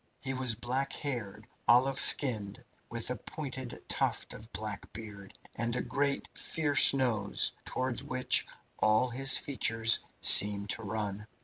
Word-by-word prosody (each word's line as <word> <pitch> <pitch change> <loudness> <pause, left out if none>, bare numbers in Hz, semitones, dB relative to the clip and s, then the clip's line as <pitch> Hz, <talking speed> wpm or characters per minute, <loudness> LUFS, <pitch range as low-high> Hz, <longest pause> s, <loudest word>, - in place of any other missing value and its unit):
He 135 0 -5
was 130 -3 -1
black 125 +4 -4
haired, 110 -7 -5 0.2
olive 130 +3 +3
skinned, 105 -7 0 0.2
with 115 +1 -4
a - - -3
pointed 130 -1 -8
tuft - - -2
of 110 +2 -13
black 105 -3 -7
beard, 100 -2 -10 0.2
and 115 +1 -2
a - - -2
great, 140 0 -2
fierce 145 -3 +3
nose, 120 -7 -1
towards 130 -1 -2
which 130 -1 +1 0.3
all 110 +4 +2
his 135 +1 +4
features 115 -5 +2 0.2
seemed 100 0 +7
to - - -3
run. 105 -1 -5
120 Hz, 135 wpm, -30 LUFS, 105-130 Hz, 0.3 s, seemed